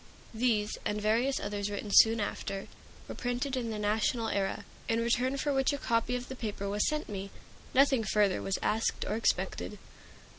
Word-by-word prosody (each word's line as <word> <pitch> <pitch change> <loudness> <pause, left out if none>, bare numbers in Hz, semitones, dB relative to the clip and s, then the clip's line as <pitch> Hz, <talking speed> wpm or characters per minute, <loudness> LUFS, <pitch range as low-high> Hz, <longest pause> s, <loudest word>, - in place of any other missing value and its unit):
These, 220 -2 +1
and 210 - -1
various 230 +6 +2
others 205 0 -3
written 205 0 -4
soon 225 0 +7
after, 200 -1 -3 0.4
were - - -6
printed 250 +2 -2
in 240 -3 -2
the 220 - -3
"National 215 +2 +1
Era," 195 -1 -1 0.2
in 225 0 +2
return 245 +3 +1
for 290 +1 0
which 270 +1 +2
a - - -1
copy 230 -1 0
of 250 0 -4
the 260 - -6
paper 210 -4 -4
was 205 +1 +1
sent 305 0 -2
me. 195 -1 -5 0.5
Nothing 270 -3 +5
further 205 -2 +2
was 195 - -1
asked 220 +1 0
or - - -1
expected. 225 +1 -1
225 Hz, 180 wpm, -31 LUFS, 205-250 Hz, 0.5 s, soon